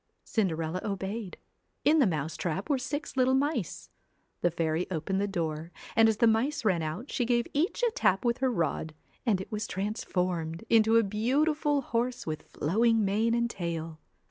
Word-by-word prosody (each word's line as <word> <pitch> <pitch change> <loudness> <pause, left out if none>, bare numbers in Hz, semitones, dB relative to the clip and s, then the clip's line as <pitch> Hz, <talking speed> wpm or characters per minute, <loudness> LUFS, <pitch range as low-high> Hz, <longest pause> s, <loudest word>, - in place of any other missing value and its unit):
Cinderella 170 -4 -1
obeyed. 200 0 -4 0.5
In 315 +2 +5
the 265 - +5
mouse 155 -3 -2
trap 185 - -2
were 275 - +2
six 290 +4 -4
little 260 0 +3
mice. 285 +4 -1 0.5
The 175 - +3
fairy 165 0 -1
opened 185 +3 -1
the 205 - +1
door 165 -3 -3 0.2
and 225 0 +6
as 220 - 0
the 235 - +4
mice 230 +5 +2
ran 185 -5 +3
out, 160 - -4
she 250 - 0
give 240 0 +2
each 335 +11 0
a 475 - +4
tap 195 - +1
with 235 +1 +1
her 260 -1 +2
rod, 160 -4 -1 0.3
and 205 -5 +3
it 190 - -7
was 210 -1 -2
transformed 180 -4 -2
into 225 0 +5
a 230 - +5
beautiful 285 +8 +1
horse 245 0 -2
with 155 -1 -3
26 - - -19
flowing 220 +7 +3
mane 220 +4 +2
and 235 0 +1
tail. 165 -6 -4
210 Hz, 180 wpm, -29 LUFS, 170-240 Hz, 0.5 s, and